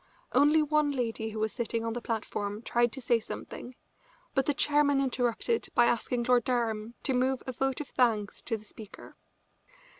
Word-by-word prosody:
Only 300 Hz, +2 st, +5 dB
one 300 Hz, -1 st, +2 dB
lady 230 Hz, -4 st, -2 dB
who 220 Hz, -, -7 dB
was 215 Hz, 0 st, -1 dB
sitting 230 Hz, -1 st, -2 dB
on 230 Hz, -, -1 dB
the 240 Hz, -, -4 dB
platform 215 Hz, -2 st, -3 dB
tried 240 Hz, 0 st, +2 dB
to 270 Hz, -, -5 dB
say 240 Hz, -1 st, +3 dB
something, 245 Hz, +2 st, -8 dB, 0.6 s
but 270 Hz, -2 st, +1 dB
the 290 Hz, -, +3 dB
chairman 290 Hz, -1 st, +3 dB
interrupted 255 Hz, -, 0 dB
by 240 Hz, -, +6 dB
asking 240 Hz, +1 st, 0 dB
Lord 245 Hz, 0 st, +3 dB
Durham 230 Hz, -2 st, -1 dB
to 265 Hz, -, +1 dB
move 255 Hz, +1 st, +1 dB
a 260 Hz, -, -3 dB
vote 265 Hz, +1 st, -1 dB
of 290 Hz, -, -7 dB
thanks 225 Hz, -5 st, +1 dB
to 225 Hz, -, -2 dB
the 215 Hz, -, -15 dB
speaker. 215 Hz, -1 st, -11 dB
240 Hz, 180 wpm, -29 LUFS, 225-270 Hz, 0.6 s, by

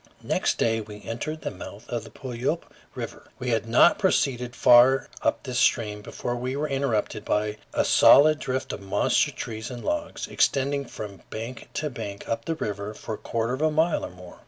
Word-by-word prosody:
Next -, -, 0 dB
day 115 Hz, -1 st, +1 dB
we 105 Hz, -1 st, -10 dB
entered 155 Hz, +7 st, -4 dB
the -, -, -3 dB
mouth 100 Hz, +3 st, -10 dB
of 120 Hz, -3 st, -3 dB
the -, -, -11 dB
Puyallup 130 Hz, +6 st, -4 dB, 0.2 s
River. -, -, -7 dB
We 125 Hz, -, -3 dB
had 115 Hz, -1 st, 0 dB
not 120 Hz, +9 st, +5 dB
proceeded 125 Hz, -, +1 dB
far 125 Hz, +2 st, +6 dB
up -, -, 0 dB
this 125 Hz, -2 st, -2 dB
stream 105 Hz, -2 st, +2 dB
before 120 Hz, +3 st, -4 dB
we 125 Hz, +2 st, -3 dB
were 150 Hz, +2 st, -1 dB
interrupted 135 Hz, -7 st, -1 dB
by 105 Hz, 0 st, 0 dB
a -, -, +1 dB
solid 155 Hz, +1 st, +7 dB
drift 130 Hz, 0 st, -3 dB
of -, -, -6 dB
monster 95 Hz, -1 st, +2 dB
trees 110 Hz, -2 st, -6 dB
and 125 Hz, -2 st, -7 dB
logs, 300 Hz, 0 st, -2 dB
extending 140 Hz, +1 st, +1 dB
from 105 Hz, -5 st, -8 dB
bank 115 Hz, +2 st, -7 dB
to 150 Hz, -1 st, -2 dB
bank 100 Hz, -4 st, -7 dB
up 115 Hz, 0 st, -2 dB
the 165 Hz, -, -1 dB
river 105 Hz, -6 st, -4 dB
for 110 Hz, -, -6 dB
a -, -, -4 dB
quarter 115 Hz, +1 st, -2 dB
of 130 Hz, -, -3 dB
a 155 Hz, -, +4 dB
mile 160 Hz, +2 st, +1 dB
or -, -, -4 dB
more. 90 Hz, 0 st, -13 dB
120 Hz, 195 wpm, -26 LUFS, 110-140 Hz, 0.2 s, solid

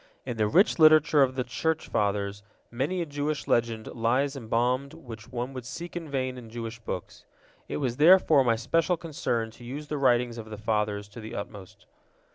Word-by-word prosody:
In 120 Hz, -3 st, -4 dB
the 105 Hz, -1 st, +2 dB
rich 180 Hz, -, +3 dB
literature 155 Hz, -1 st, +6 dB
of 130 Hz, -1 st, +3 dB
the 130 Hz, -, 0 dB
Church 160 Hz, +7 st, -2 dB
Fathers 100 Hz, -1 st, -1 dB, 0.3 s
many 145 Hz, +9 st, -1 dB
a -, -, -5 dB
Jewish 145 Hz, 0 st, -3 dB
legend 115 Hz, -2 st, +1 dB
lies 125 Hz, +5 st, 0 dB
embalmed 125 Hz, +4 st, -1 dB
which 120 Hz, -7 st, -11 dB
one 125 Hz, +2 st, -4 dB
would 130 Hz, -1 st, -6 dB
seek 170 Hz, +9 st, -7 dB
in 165 Hz, -3 st, -5 dB
vain 130 Hz, -2 st, -2 dB
in 115 Hz, -2 st, -12 dB
Jewish 115 Hz, 0 st, -6 dB
books. 95 Hz, -5 st, -6 dB, 0.4 s
It -, -, -3 dB
was 125 Hz, -4 st, -2 dB
therefore 160 Hz, -3 st, +6 dB
my 115 Hz, -2 st, +3 dB
special 165 Hz, +9 st, +1 dB
concern 120 Hz, -8 st, -2 dB
to 120 Hz, -, -15 dB
use 140 Hz, +5 st, -7 dB
the 150 Hz, -, -2 dB
writings 120 Hz, -3 st, +2 dB
of 110 Hz, -1 st, -8 dB
the 105 Hz, -, -7 dB
Fathers 105 Hz, -1 st, -1 dB
to 115 Hz, +3 st, -10 dB
the 110 Hz, -, -8 dB
utmost. 100 Hz, -2 st, -8 dB
125 Hz, 190 wpm, -27 LUFS, 115-145 Hz, 0.4 s, literature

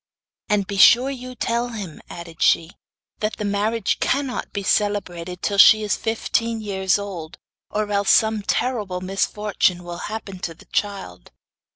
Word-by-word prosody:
'And 205 Hz, -2 st, +2 dB
be 200 Hz, 0 st, -5 dB
sure 245 Hz, +7 st, +6 dB
you 255 Hz, -1 st, -8 dB
tell 235 Hz, 0 st, -1 dB
him,' 205 Hz, -9 st, -7 dB
added 170 Hz, -1 st, -10 dB
she, 165 Hz, +1 st, +3 dB, 0.5 s
'that 215 Hz, 0 st, -2 dB
the 210 Hz, -, -3 dB
marriage 205 Hz, +1 st, 0 dB
cannot 270 Hz, -2 st, -1 dB
be 200 Hz, -, -4 dB
celebrated 180 Hz, -4 st, -1 dB
till 200 Hz, -1 st, 0 dB
she 215 Hz, +2 st, +8 dB
is 210 Hz, -, 0 dB
fifteen 230 Hz, 0 st, -1 dB
years 190 Hz, -3 st, 0 dB
old, 185 Hz, -6 st, -7 dB, 0.3 s
or 215 Hz, 0 st, -1 dB
else 200 Hz, -1 st, +1 dB
some 220 Hz, -1 st, +4 dB
terrible 205 Hz, -5 st, -1 dB
misfortune 195 Hz, -1 st, 0 dB
will 175 Hz, 0 st, -7 dB
happen 210 Hz, -3 st, -6 dB
to 165 Hz, -2 st, -5 dB
the -, -, -18 dB
child. 195 Hz, -, -4 dB
205 Hz, 155 wpm, -22 LUFS, 185-220 Hz, 0.5 s, she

